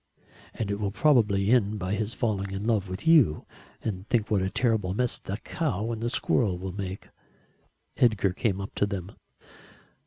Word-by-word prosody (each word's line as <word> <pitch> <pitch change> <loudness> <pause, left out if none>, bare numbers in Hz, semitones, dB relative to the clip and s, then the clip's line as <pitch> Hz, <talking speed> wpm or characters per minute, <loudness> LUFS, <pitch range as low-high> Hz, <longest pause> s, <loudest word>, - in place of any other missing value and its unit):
"And 105 -3 -2
it 100 - -2
will 100 -2 0
probably 110 -4 +3
end 110 -4 +3
by 95 0 -2
his 110 +2 -2
falling 100 -5 -1
in 95 +1 -4
love 105 -4 0
with 95 +2 -6
you 145 - +5 0.4
and 95 -2 -4
think 110 -3 +1
what 100 -3 +3
a 95 - 0
terrible 110 -5 0
mess 125 +1 0
the 100 - -5
cow 115 - -2
and 115 -1 -4
the 120 - 0
squirrel 110 -6 +1
will 95 0 -5
make." 95 -1 -6 0.9
Edgar 110 -6 +3
came 100 -1 -1
up 100 - -6
to 100 - +1
them. 100 -2 -5
105 Hz, 180 wpm, -27 LUFS, 95-115 Hz, 0.9 s, you